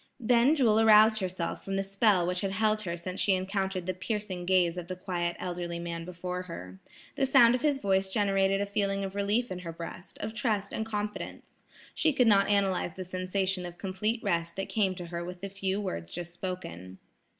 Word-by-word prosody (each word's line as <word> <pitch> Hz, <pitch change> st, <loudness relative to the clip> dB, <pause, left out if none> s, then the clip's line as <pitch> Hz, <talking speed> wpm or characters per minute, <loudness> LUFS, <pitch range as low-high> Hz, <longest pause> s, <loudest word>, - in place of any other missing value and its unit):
Then 245 Hz, +4 st, +4 dB
Jewel 225 Hz, -7 st, +4 dB
aroused 220 Hz, 0 st, +7 dB
herself 185 Hz, -3 st, -3 dB
from 195 Hz, -, -3 dB
the 195 Hz, -, 0 dB
spell 195 Hz, -2 st, +3 dB
which 180 Hz, +1 st, -1 dB
had 195 Hz, -1 st, -2 dB
held 215 Hz, +1 st, +2 dB
her 170 Hz, -4 st, -3 dB
since 185 Hz, +2 st, -5 dB
she 195 Hz, -, +3 dB
encountered 190 Hz, -1 st, -2 dB
the 185 Hz, -, -1 dB
piercing 185 Hz, -1 st, -4 dB
gaze 180 Hz, -2 st, +3 dB
of 175 Hz, -1 st, -6 dB
the 185 Hz, -, -4 dB
quiet 175 Hz, -2 st, -2 dB
elderly 175 Hz, -1 st, -4 dB
man 170 Hz, -1 st, -5 dB
before 180 Hz, +1 st, -4 dB
her. 95 Hz, -, -9 dB, 0.4 s
The 270 Hz, -, +2 dB
sound 245 Hz, -3 st, +7 dB
of 250 Hz, -, 0 dB
his 290 Hz, -1 st, +2 dB
voice 195 Hz, -5 st, +1 dB
generated 195 Hz, -1 st, +2 dB
a -, -, +1 dB
feeling 200 Hz, -1 st, 0 dB
of 195 Hz, -1 st, -4 dB
relief 205 Hz, +4 st, 0 dB
in 180 Hz, -, -4 dB
her 170 Hz, -2 st, -6 dB
breast, 170 Hz, +3 st, -9 dB
of 215 Hz, +1 st, -5 dB
trust 210 Hz, -3 st, -1 dB
and 220 Hz, -, -2 dB
confidence. 210 Hz, -1 st, -5 dB, 0.3 s
She 315 Hz, -, +2 dB
could 255 Hz, -2 st, +4 dB
not 200 Hz, -3 st, +5 dB
analyze 195 Hz, -4 st, +1 dB
the 185 Hz, -, -6 dB
sensation 185 Hz, +1 st, -1 dB
of 175 Hz, 0 st, -8 dB
complete 205 Hz, +5 st, -2 dB
rest 170 Hz, -4 st, -1 dB
that 195 Hz, -, -4 dB
came 195 Hz, -4 st, +1 dB
to 175 Hz, -1 st, -7 dB
her 170 Hz, 0 st, -5 dB
with 180 Hz, 0 st, -8 dB
the 200 Hz, -, -4 dB
few 195 Hz, 0 st, -2 dB
words 85 Hz, -, -4 dB
just 175 Hz, 0 st, -6 dB
spoken. 95 Hz, -, -6 dB
190 Hz, 205 wpm, -29 LUFS, 180-210 Hz, 0.4 s, aroused